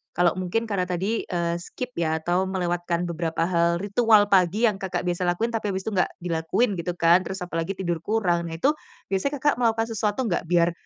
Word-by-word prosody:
kalau 175 -1 +4
mungkin 185 +5 -1
karena 200 -5 -1
tadi, 190 +5 -2
eee, 170 -1 -1
skip 250 +8 -7
ya, 160 -1 +1
atau 180 +3 +1
melewatkan 175 -2 -1
beberapa 165 -1 -2
hal 170 0 +1
ritual 205 0 +4
pagi 190 +3 +3
yang 210 -4 +3
Kakak 185 -3 -3
biasa 180 0 -1
lakuin, 200 +7 0
tapi 225 -2 -2
abis 190 - -3
itu 220 - -3
nggak 185 -3 +2 0.2
dilakuin 180 +5 0
gitu 175 +1 -3
kan, 170 +1 +5
terus 190 -1 -5
apalagi 165 +2 -3
tidur 175 -3 -2
kurang. 175 -3 0
Nah 165 - -5
itu, 270 - +3 0.4
biasanya 195 +10 0
Kakak 295 - +4
melakukan 225 -1 +2
sesuatu 215 +2 -1
nggak 185 -7 -1
biar, 170 0 +3
180 Hz, 200 wpm, -25 LUFS, 170-205 Hz, 0.4 s, kan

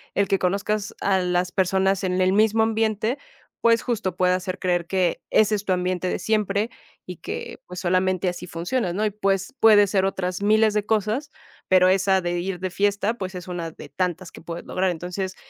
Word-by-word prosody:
el 200 - +2
que 195 -1 +1
conozcas 200 +2 -1
a 195 -1 +2
las 180 0 0
personas 190 +1 +1
en 185 0 0
el 185 0 +3
mismo 220 +2 +3
ambiente, 220 +2 0 0.4
pues 230 -1 +4
justo 210 -7 -2
puede 180 0 +2
hacer 185 0 -3
creer 175 -2 0
que 185 -2 0
ese 215 0 +4
es 205 0 -5
tu 190 - +2
ambiente 180 0 -1
de - - -2
siempre 210 +1 0 0.4
y 180 -2 -7
que - - -6
pues 180 0 -7
solamente 185 0 +1
así 175 - -6
funciona, 175 +4 -2
¿no? 205 +4 -1
Y - - +2
pues 195 -2 -1
puede 210 -2 +6
ser 190 -1 +1
otras 185 0 -2
miles 215 +1 +4
de 210 -1 0
cosas, 220 +7 -1 0.4
pero 185 0 +5
esa 190 0 +3
de 175 0 -2
ir 180 0 -3
de 185 +1 -2
fiesta, 205 +3 0
pues 190 -4 -5
es 180 0 -7
una 170 -2 -4
de 150 - -12
tantas 180 +3 -3
que - - -12
puedes 170 0 -7
lograr, 185 0 0
entonces 180 +3 -4
190 Hz, 200 wpm, -23 LUFS, 180-210 Hz, 0.4 s, puede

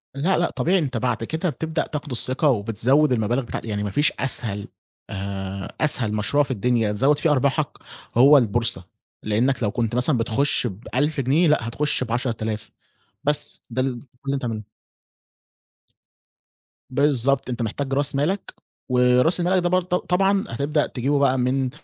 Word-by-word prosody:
لأ، 165 +7 +1
لأ، 175 - +1
طبيعي 185 +3 +1
أنت 135 -7 -2
بعد 115 -1 -1
كده 160 +8 -2
بتبدأ 160 +3 -3
تاخُد 150 -2 -6
الثقة 130 +5 +2
وبتزوّد 125 +6 +2
المَبالغ 120 +2 +1
بتاع 120 - -6
يعني 105 -2 -3
ما 100 - -3
فيش 145 +8 +2
أسهل 110 -6 -1 0.4
آآ 95 0 -5
أسهل 125 -8 +3
مشروع 105 +8 +2
في 140 - -5
الدنيا 115 -1 +1
تزوّد 135 +8 +2
فيه 155 +1 +2
أرباحك 140 +1 +1 0.5
هو 140 +4 +8
البورصة، 115 -3 0 0.4
لإنّك 115 +4 0
لو 105 - +1
كنت 115 -1 -2
مثلًا 125 +2 +2
بتخُش 120 +3 +1
ب1000 130 +9 -2
جنيه، 150 +7 +3
لأ، 135 -6 +2
هتخُش 145 +3 -1
ب10000 115 -3 -3 0.5
بس 150 0 0
ده 130 +2 -1
ال 130 -2 -2
كل - - -18 0.2
اللي 140 0 0
بتعمله. 115 -5 -4 2.3
بالضبط، 135 -1 +1
أنت 120 -1 -3
محتاج 135 +5 -3
راس 140 0 0
مالك، 170 +8 -1 0.4
وراس 125 +7 +3
مَالك 180 +1 +1
ده 175 - +1
برضه 185 0 +1
ط 180 - 0
طبعًا 195 +2 +2
هتبدأ 145 +5 0
تجيبه 140 +3 -1
بقى 135 -2 +3
من 130 +1 0
130 Hz, 155 wpm, -23 LUFS, 115-150 Hz, 2.3 s, هو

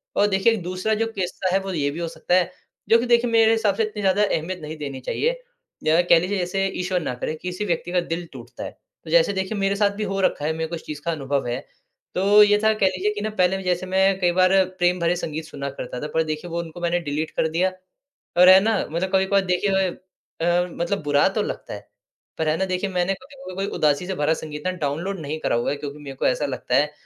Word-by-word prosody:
और 205 - +4
देखिए, 205 +3 +3
दूसरा 185 +3 -2
जो 225 - +3
किस्सा 185 -1 -2
है, 195 - +4
वो 195 0 -5
ये 145 -4 0
भी 160 - -6
हो 170 - -2
सकता 175 +2 -1
है 185 -1 +2 0.4
जो 230 +1 +6
कि 245 - -1
देखिए 240 0 +3
मेरे 225 -1 +5
हिसाब 220 -3 +2
से 225 - +1
इतनी 215 -1 -4
ज़्यादा 195 +1 +3
अहमियत 180 -2 -1
नहीं 155 +1 -7
देनी 140 -3 -5
चाहिए। - - -1 0.4
या 160 +2 +4
कह 170 -1 +5
लीजिए 190 +4 -2
जैसे 185 +2 -1 0.2
ईश्वर 180 0 0
ना 130 - -3
करे, 125 - -3
किसी 180 +3 -4
व्यक्ति 175 -1 -2
का 180 - +2
दिल 170 +1 -4
टूटता - - -9
है, - - -5 0.3
तो - - -11
जैसे - - +4
देखिए 190 +2 -2
मेरे 195 0 +1
साथ 200 0 +2
भी 215 - -2
हो 195 -1 -2
रखा 150 -5 +1
है 160 - +1
मेरे 160 0 -3
को 170 - -3
इस 165 - -9
चीज़ 150 -1 -6
का 170 - +1
अनुभव 140 -4 -2
है, 120 - -2 0.6
तो 205 +3 +6
ये 205 0 +4
था 220 0 +5
कह 215 -2 +1
लीजिए 185 +3 0
कि 205 - -5
ना 215 - -1
पहले 190 +2 +2
जैसे 180 0 0
मैं 190 +1 +2
कई 175 -1 +3
बार 190 +1 +5 0.2
प्रेम 175 0 +2
भरे 170 +1 +2
संगीत 160 -2 -4
सुना 140 -2 -5
करता 125 -2 -6
था 150 - -3
पर 160 - +2
देखिए 155 +2 -4
वो 170 - -2
उनको 170 +1 -10
मैंने 175 0 +1
डिलीट 155 +2 -2
कर - - +2
दिया। 180 +4 +1 0.7
और 180 +1 +8
है 185 0 +10
ना 220 +2 +1
मतलब 175 +4 -2
कभी-कभार 190 +1 +3
देखिए 190 +1 +1 0.5
अ, 175 +1 +2
मतलब 175 +3 -2
बुरा 145 -1 +3
तो - - -1
लगता - - -5
है, - - -11 0.5
पर 160 - 0
है 155 - +2
ना, 190 - 0
देखिए 185 +1 -2
मैंने 180 +1 +1
अभी 265 +8 -10
भी 185 - -7
कोई 195 +1 -2
उदासी 150 +2 +2
से 190 - -2
भरा 155 -1 +1
संगीत 150 -2 -7
ना - - +2
डाउनलोड 170 +7 -2
नहीं 155 +1 -4
करा - - 0
हुआ 120 - 0
है 145 - -1
क्योंकि 145 0 -7
मेरे 140 -3 -9
को - - 0
ऐसा 145 +3 +1
लगता 130 -2 -3
है, 150 +2 +2
180 Hz, 255 wpm, -23 LUFS, 155-195 Hz, 0.7 s, है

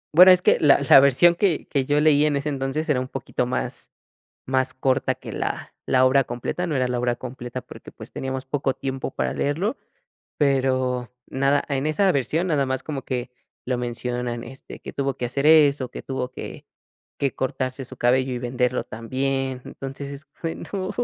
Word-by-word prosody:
Bueno 185 +2 +10
es 180 - +5
que - - +4
la 145 -2 +6
la 135 - +10
versión 140 +6 +5
que 175 -4 +1
que 140 -3 0
yo 145 +2 +2
leí 150 -1 +4
en 145 -2 +1
ese 140 - -3
entonces 140 +2 -2
era 135 -4 +2
un 130 - -5
poquito 125 -1 -2
más 125 +1 -4 0.5
más 130 0 0
corta 130 0 +1
que - - -9
la - - -4
la 130 0 +4
obra 135 +1 +4
completa, 125 +9 -3
no 155 - -2
era 130 -1 +1
la 125 -1 -1
obra 120 0 +1
completa 125 0 -7
porque 125 - -12
pues - - -12
teníamos 130 0 -4
poco 135 -1 -1
tiempo 135 0 -4
para - - -2
leerlo, 180 - -1 0.6
pero, 130 -3 +1
nada, 140 +2 +1
en 135 0 -1
esa 185 +5 +3
versión 150 +6 0
nada 145 -5 +2
más 130 0 -2
como 145 -4 -5
que 125 -1 -3 0.4
lo 125 -1 -1
mencionan, 120 0 -3
este, 135 +2 -11
que - - -8
tuvo 135 -1 -2
que 125 - -2
hacer 140 +4 -2
eso, 145 -4 +5
que - - -7
tuvo 130 -2 -4
que - - -8 0.5
que 140 -2 -1
cortarse 130 0 -3
su 130 - -11
cabello 130 +2 +2
y - - -2
venderlo 125 0 -1
también. 130 +3 -2
Entonces, 135 +1 -7
es 140 +2 -9 0.2
bueno, 185 +3 -4
135 Hz, 190 wpm, -24 LUFS, 125-145 Hz, 0.6 s, Bueno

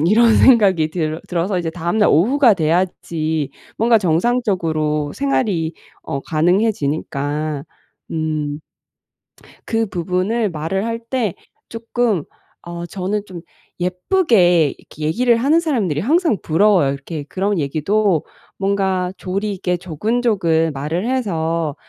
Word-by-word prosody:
음' 160 - +2
이런 225 +3 +5
생각이 190 -11 +5
들어 160 -2 -2
들어서 180 +2 -1 0.2
다음날 175 +5 +1
오후가 235 - +4
돼야지 160 -3 -1 0.3
뭔가 230 0 +4
정상적으로 165 - 0
생활이 205 - 0 0.3
어 140 - -4
가능해지니까 155 -5 -1 0.5
음 155 -2 -2 1.1
그 225 0 0
부분을 185 +5 -1
말을 170 +6 -2
할 230 0 -2
때 235 -8 -1 0.3
쪼끔 230 -6 -1 0.4
어 175 0 -6
저는 200 +3 -3
좀 180 -4 -9 0.4
예쁘게 180 - +2
이렇게 150 - -11
얘기를 235 +9 +3
하는 290 +7 +3
사람들이 220 - 0
항상 310 - +2
부러워요. 170 -4 +3
이렇게 145 +2 -6
그런 195 +6 -2
얘기도 165 +5 +1 0.3
뭔가 190 -2 0
조리 200 +3 -3
있게 180 -1 -1
조근조근 180 -3 0
말을 160 - -3
해서 165 - -1
180 Hz, 260 characters per minute, -19 LUFS, 160-215 Hz, 1.1 s, 이런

